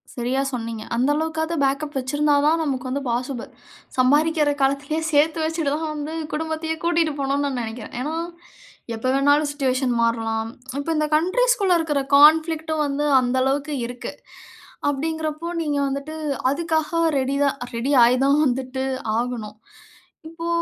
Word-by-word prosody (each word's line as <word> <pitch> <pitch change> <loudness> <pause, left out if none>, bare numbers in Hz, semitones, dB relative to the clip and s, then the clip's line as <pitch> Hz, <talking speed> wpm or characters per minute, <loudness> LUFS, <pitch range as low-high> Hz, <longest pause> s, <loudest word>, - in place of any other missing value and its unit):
சரியா 250 +2 -1
சொன்னீங்க. 230 -2 -4
அந்த 250 +4 +2
அளவுக்காவது 320 +1 -1
பேக்கப் 275 +2 -1
வைச்சிருந்தா 290 +3 +1
தான், 320 +2 +3
நமக்கு 260 -4 -2
வந்து 275 +2 -2
பாசிபிள். 245 +1 -2 0.5
சம்பாரிக்கிற 295 +3 +3
காலத்துலயே 280 +3 0
சேத்து 310 +3 +3
வச்சுட்டு 320 -3 -1
தான் 315 -1 -3
வந்து, 300 +1 -5 0.2
குடும்பத்தையே 320 +1 -2
கூட்டிட்டு 335 -2 +2
போணும்னு 280 +1 0
நான் 265 -3 -2
நெனைக்கிறேன். 225 0 -7
ஏன்னா, 300 +4 -3 0.8
எப்ப 225 +3 -3
வேணாலும் 285 +2 +3
சிட்டுவேஷன் 260 -3 0
மாறலாம். 225 -1 -1 0.3
இப்போ, 285 - -4
இந்த 305 - +1
கண்ட்ரீஸ்‌க்குள்ள 395 +2 +3
இருக்குற 295 -3 0 0.2
கான்ஃபிளிக்ட்‌டும் 315 +1 +4
வந்து 285 +1 -1 0.2
அந்த 250 +1 0
அளவுக்கு 280 +2 -1
இருக்கு, 245 0 -7 0.8
அப்படிங்கிறப்போ 315 +2 -3
நீங்க 295 -2 -1
வந்துட்டு 280 +3 -4 0.3
அதுக்காக 315 +1 0 0.3
ரெடி 270 +1 0
தான் 280 - +1 0.2
ரெடி 245 +5 -1
ஆய் 245 +2 +5
தான் 285 +2 +4
வந்துட்டு 260 0 -1 0.4
ஆகணும். 235 -4 -4 0.7
இப்போ 330 +1 -7
285 Hz, 135 wpm, -22 LUFS, 260-315 Hz, 0.8 s, ஆய்